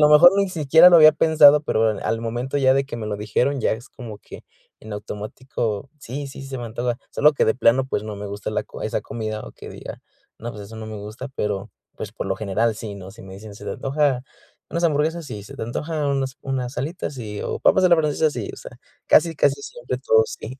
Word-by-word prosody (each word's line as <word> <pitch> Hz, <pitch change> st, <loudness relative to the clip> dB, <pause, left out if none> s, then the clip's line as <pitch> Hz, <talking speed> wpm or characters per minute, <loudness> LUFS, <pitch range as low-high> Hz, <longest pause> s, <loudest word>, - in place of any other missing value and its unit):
lo -, -, +4 dB
mejor 165 Hz, +4 st, +9 dB
ni 200 Hz, -1 st, +2 dB
siquiera 160 Hz, 0 st, +6 dB
lo 175 Hz, -, +8 dB
había 155 Hz, -1 st, +9 dB
pensado, 150 Hz, -2 st, +6 dB
pero 110 Hz, -5 st, +2 dB
al 115 Hz, -, -1 dB
momento 120 Hz, +4 st, -3 dB
ya 130 Hz, -1 st, +4 dB
de 135 Hz, -, +2 dB
que 135 Hz, -3 st, -7 dB
me 110 Hz, -2 st, -5 dB
lo 105 Hz, -, -3 dB
dijeron, 125 Hz, +6 st, 0 dB
ya -, -, +1 dB
es 115 Hz, +3 st, -7 dB
como 115 Hz, -4 st, -9 dB
que -, -, -12 dB, 0.4 s
en 110 Hz, -1 st, -9 dB
automático, 105 Hz, +2 st, -5 dB
sí, 140 Hz, +3 st, -6 dB
sí, 135 Hz, 0 st, -9 dB
se 135 Hz, -1 st, -6 dB
me 120 Hz, -, -5 dB
antoja. 120 Hz, +2 st, -2 dB, 0.2 s
Solo 150 Hz, +1 st, +4 dB
que -, -, +2 dB
de 110 Hz, -, +2 dB
plano, 130 Hz, +1 st, +3 dB
pues, 105 Hz, -, -2 dB
no 105 Hz, -1 st, -6 dB
me 100 Hz, -, -7 dB
gusta 100 Hz, +1 st, -6 dB
la -, -, -1 dB
co -, -, -11 dB
esa -, -, -2 dB
comida, 110 Hz, -1 st, -5 dB
o -, -, -10 dB
que -, -, -11 dB
diga: -, -, -9 dB, 0.4 s
"No, 120 Hz, -, -5 dB
pues 105 Hz, -, -9 dB
eso 110 Hz, +3 st, -11 dB
no 110 Hz, 0 st, -7 dB
me 110 Hz, -, -7 dB
gusta", 105 Hz, +6 st, -8 dB
pero, 105 Hz, 0 st, -2 dB, 0.3 s
pues, -, -, -6 dB
por -, -, -5 dB
lo 95 Hz, -, 0 dB
general 110 Hz, +3 st, 0 dB
sí, 105 Hz, -1 st, -7 dB
¿no? 95 Hz, -1 st, -10 dB
Si 110 Hz, +4 st, -14 dB
me 95 Hz, 0 st, -11 dB
dicen: 105 Hz, +1 st, -10 dB
"¿Se -, -, -12 dB
te -, -, -3 dB
antoja 135 Hz, -2 st, 0 dB, 0.5 s
unas 170 Hz, 0 st, -1 dB
hamburguesas?" 160 Hz, +1 st, +1 dB
Sí. 105 Hz, -6 st, -7 dB
"¿Se -, -, -11 dB
te -, -, -6 dB
antoja 150 Hz, +6 st, -3 dB
unas 135 Hz, -1 st, -1 dB
unas 130 Hz, -1 st, -3 dB
alitas?" 155 Hz, +1 st, -4 dB
Sí. 105 Hz, -5 st, -6 dB
O, -, -, -3 dB
"¿papas 190 Hz, -, +4 dB
a -, -, +6 dB
la 170 Hz, -, +7 dB
francesa?" 155 Hz, 0 st, +1 dB
Sí, 120 Hz, -7 st, -5 dB
o -, -, -10 dB
sea, -, -, -10 dB, 0.3 s
casi, 165 Hz, 0 st, +4 dB
casi 140 Hz, -1 st, +2 dB
siempre 125 Hz, +1 st, -5 dB
todo 110 Hz, -4 st, +4 dB
sí. 125 Hz, +4 st, -8 dB
125 Hz, 245 wpm, -22 LUFS, 110-145 Hz, 0.5 s, mejor